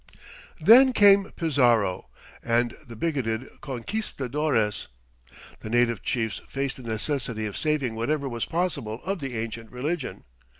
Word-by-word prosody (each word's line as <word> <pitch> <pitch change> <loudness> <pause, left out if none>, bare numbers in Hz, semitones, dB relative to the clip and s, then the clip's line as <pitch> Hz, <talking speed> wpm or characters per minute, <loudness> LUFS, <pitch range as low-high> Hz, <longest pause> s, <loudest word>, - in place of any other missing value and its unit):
Then 250 - +7
came 200 -3 +6
Pizarro 120 - +2 0.3
and 120 +1 +1
the 120 -5 -11
bigoted 130 -4 -2
conquistadores. 135 - -2 0.7
The 110 - -8
native 120 -1 +2
chiefs 115 -4 -2
faced 135 -1 -3
the - - -10
necessity 115 0 -2
of 105 - -5
saving 150 -6 0
whatever 140 +6 -1
was 120 -3 -3
possible 145 -10 -2
of 195 0 -2
the 135 -5 -4
ancient 115 0 -5
religion. 145 +4 -4
125 Hz, 125 wpm, -26 LUFS, 115-155 Hz, 0.7 s, Then